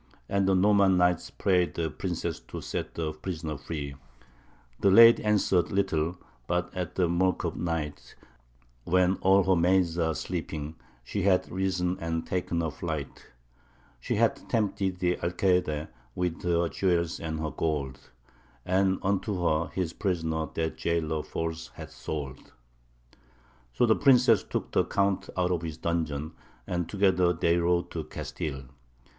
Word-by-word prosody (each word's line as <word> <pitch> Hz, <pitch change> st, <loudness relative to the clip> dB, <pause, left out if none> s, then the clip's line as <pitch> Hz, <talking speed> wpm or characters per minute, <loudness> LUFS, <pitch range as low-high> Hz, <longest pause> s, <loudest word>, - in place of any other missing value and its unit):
And 100 Hz, -1 st, +1 dB
the 95 Hz, -, +4 dB
Norman 100 Hz, -1 st, +4 dB
knight 90 Hz, -1 st, +2 dB
prayed 90 Hz, -3 st, +2 dB
the 80 Hz, -2 st, -1 dB
princess -, -, -3 dB
to -, -, -6 dB
set -, -, -5 dB
the 80 Hz, -2 st, -2 dB
prisoner 80 Hz, -1 st, -5 dB
free. 70 Hz, -1 st, -5 dB, 0.9 s
The 100 Hz, -, +4 dB
lady 115 Hz, +4 st, +8 dB
answered 100 Hz, -5 st, +2 dB
little, 90 Hz, -4 st, 0 dB, 0.3 s
but 90 Hz, +1 st, -1 dB
at 90 Hz, -1 st, -4 dB
the 90 Hz, -2 st, +2 dB
mirk 90 Hz, +2 st, +1 dB
of -, -, -2 dB
night, 80 Hz, -4 st, -4 dB, 0.7 s
When 90 Hz, +3 st, +2 dB
all 95 Hz, +1 st, +4 dB
her 95 Hz, 0 st, +3 dB
maids 90 Hz, 0 st, +2 dB
are 80 Hz, -2 st, +1 dB
sleeping, 80 Hz, -3 st, -4 dB, 0.3 s
she 100 Hz, +11 st, -3 dB
hath 95 Hz, -1 st, +2 dB
risen 90 Hz, -1 st, -1 dB
and 80 Hz, 0 st, -2 dB
ta'en 90 Hz, -2 st, -1 dB
her 80 Hz, -2 st, -2 dB
flight: 80 Hz, -2 st, -5 dB, 0.7 s
She -, -, -2 dB
hath -, -, +1 dB
tempted 100 Hz, -4 st, 0 dB
the 90 Hz, -1 st, +1 dB
Alcayde 85 Hz, -3 st, 0 dB, 0.3 s
with 90 Hz, -2 st, -2 dB
her 85 Hz, -1 st, +1 dB
jewels 85 Hz, -2 st, 0 dB
and 80 Hz, -1 st, -4 dB
her 80 Hz, -1 st, -2 dB
gold, 70 Hz, -5 st, -3 dB, 0.6 s
And 95 Hz, +1 st, +2 dB
unto 100 Hz, -1 st, 0 dB
her 80 Hz, 0 st, +2 dB
his 90 Hz, -3 st, -3 dB
prisoner 80 Hz, -5 st, -1 dB
that 80 Hz, -1 st, -2 dB
jailor 80 Hz, -2 st, -1 dB
false 80 Hz, +1 st, -4 dB
hath -, -, -9 dB
sold. 70 Hz, -3 st, -6 dB, 1.2 s
So 120 Hz, -, +2 dB
the 110 Hz, -2 st, +4 dB
princess 125 Hz, -7 st, +5 dB
took -, -, -4 dB
the -, -, +3 dB
Count 100 Hz, -1 st, 0 dB
out 90 Hz, 0 st, +1 dB
of 85 Hz, -2 st, 0 dB
his 80 Hz, -2 st, -5 dB
dungeon, 80 Hz, -2 st, -2 dB, 0.3 s
and 90 Hz, -2 st, -2 dB
together 95 Hz, -3 st, +3 dB
they 85 Hz, 0 st, +2 dB
rode 85 Hz, 0 st, +1 dB
to -, -, -4 dB
Castile. 70 Hz, -3 st, -5 dB
85 Hz, 150 wpm, -28 LUFS, 80-95 Hz, 1.2 s, lady